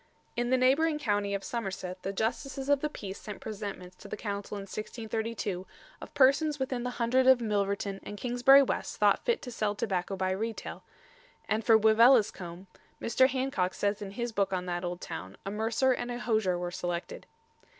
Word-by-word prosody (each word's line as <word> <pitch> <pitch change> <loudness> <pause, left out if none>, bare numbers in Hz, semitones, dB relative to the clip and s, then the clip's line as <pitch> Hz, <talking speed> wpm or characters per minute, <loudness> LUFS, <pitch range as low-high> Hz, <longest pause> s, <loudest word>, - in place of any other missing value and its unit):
In 240 0 -1
the 260 - +4
neighbouring 290 +5 +3
county 205 -7 0
of 195 - -4
Somerset 190 -5 -4
the 195 - -3
Justices 265 +7 -2
of 285 -1 +4
the 300 - -1
Peace 200 -8 -7
sent 210 -2 -7
presentments 200 -4 -6
to - - -12
the - - -5
Council 205 -1 -4
in - - -5
1632 215 -2 -4 0.3
of - - -10
persons 285 +3 +4
within 260 -2 -2
the 250 - -2
Hundred 255 +2 +2
of 260 -1 +7
Milverton 200 -3 -1
and 205 - -8
Kingsbury 250 +4 +6
West - - -3
thought - - +3
fit 475 -7 +1
to 250 - -6
sell 215 -3 -1
tobacco 195 -2 -2
by 185 0 -1
retail; 220 +4 -4 0.6
and 220 +1 0
for 225 0 +6
Wiveliscombe, 220 -5 +4 0.3
Mr. 260 +3 +4
Hancock 255 -9 -1
says 205 0 -1
in 200 - -5
his 235 +4 -4
book 200 -3 0
on 180 -1 -2
that 175 0 -3
old 175 0 -4
town, 95 +1 -7
a 195 - -3
mercer 225 +5 +1
and 245 -1 -2
a 240 - -3
hosier 215 -7 +1
were 175 0 -3
selected. 175 - -4
220 Hz, 185 wpm, -30 LUFS, 195-250 Hz, 0.6 s, of